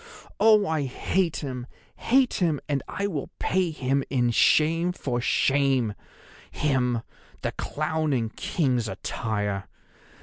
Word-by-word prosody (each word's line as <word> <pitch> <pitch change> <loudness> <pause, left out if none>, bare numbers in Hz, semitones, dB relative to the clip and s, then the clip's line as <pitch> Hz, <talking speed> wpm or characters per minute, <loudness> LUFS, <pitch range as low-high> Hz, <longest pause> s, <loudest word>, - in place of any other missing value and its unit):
Oh, 215 -1 +6
I 160 -5 0
hate 165 +6 -1
him, 125 -2 -5 0.3
hate 260 +1 +2
him, 160 -5 +2
and 140 -2 0
I 200 - -3
will 160 -9 -3
pay 185 -2 +1
him 135 -2 0
in 120 -3 +2
shame 165 +8 +3
for 125 -7 -2
shame—him, 135 -4 +2 1.5
the - - 0
clown 155 0 -2
in 115 -4 0
king's 125 -2 -1
attire. 105 0 -3
140 Hz, 115 wpm, -26 LUFS, 125-165 Hz, 1.5 s, Oh